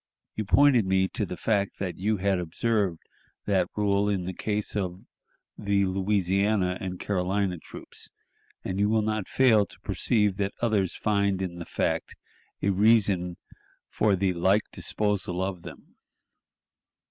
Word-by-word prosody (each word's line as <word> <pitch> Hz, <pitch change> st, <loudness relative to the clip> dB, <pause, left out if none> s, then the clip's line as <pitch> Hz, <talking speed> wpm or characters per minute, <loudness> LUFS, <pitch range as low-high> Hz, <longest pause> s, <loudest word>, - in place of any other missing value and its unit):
You 110 Hz, -, -3 dB
pointed 130 Hz, +2 st, +5 dB
me 95 Hz, 0 st, +2 dB
to 105 Hz, -, -3 dB
the 90 Hz, -, -6 dB
fact 100 Hz, -3 st, 0 dB
that 95 Hz, -3 st, -4 dB
you 105 Hz, +3 st, +1 dB
had 95 Hz, 0 st, +1 dB
observed 90 Hz, +1 st, -1 dB, 0.4 s
that -, -, +1 dB
rule 100 Hz, -1 st, +1 dB
in 95 Hz, -3 st, -1 dB
the 95 Hz, -, -4 dB
case 105 Hz, +3 st, -3 dB
of 95 Hz, -3 st, -3 dB, 0.6 s
the 100 Hz, -1 st, +1 dB
Louisiana 95 Hz, 0 st, +1 dB
and 90 Hz, -1 st, -5 dB
Carolina 95 Hz, -1 st, -1 dB
troops, -, -, -9 dB, 0.5 s
and 95 Hz, +1 st, -3 dB
you 105 Hz, +1 st, +3 dB
will 110 Hz, 0 st, +2 dB
not 110 Hz, -2 st, -2 dB
fail 115 Hz, -6 st, +4 dB
to -, -, -14 dB
perceive 105 Hz, -5 st, +1 dB
that 100 Hz, -1 st, -1 dB
others 105 Hz, -6 st, +1 dB
find 100 Hz, -2 st, +1 dB
in 90 Hz, -2 st, -4 dB
the 85 Hz, -, -6 dB
fact -, -, -2 dB, 0.5 s
a 100 Hz, -, +3 dB
reason 100 Hz, -4 st, +3 dB, 0.5 s
for 105 Hz, -2 st, +2 dB
the 95 Hz, 0 st, +1 dB
like 95 Hz, +5 st, +2 dB
disposal 100 Hz, -4 st, -1 dB
of 95 Hz, -1 st, -2 dB
them. -, -, -12 dB
100 Hz, 145 wpm, -27 LUFS, 95-105 Hz, 0.6 s, pointed